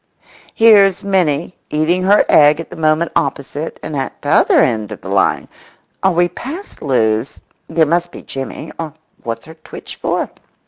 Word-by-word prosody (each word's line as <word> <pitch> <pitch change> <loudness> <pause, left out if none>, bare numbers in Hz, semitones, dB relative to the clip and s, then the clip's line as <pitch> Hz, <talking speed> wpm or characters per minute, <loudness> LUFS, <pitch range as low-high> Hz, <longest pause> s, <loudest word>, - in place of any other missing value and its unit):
Here's 200 -4 +5
Minnie 180 -4 0
eating 155 +4 +1
her 205 +2 +5
egg 150 +1 +5
at 165 - -7
the - - -8
moment 160 +1 +1
opposite 140 +2 -3
and 155 - -5
at 135 -1 -4
t'other - - +4
end 110 -3 +1
of - - -8
the - - -8
line—are 190 - -2
we 175 0 +2
past 285 - -8
Lewes?—there 130 +5 -1
must 175 +3 0
be - - -11
Jimmy—or 150 +4 -6 0.3
what's 115 0 -5
her 160 - -11
twitch 160 -1 -10
for? - - -1
160 Hz, 145 wpm, -17 LUFS, 140-180 Hz, 0.3 s, Here's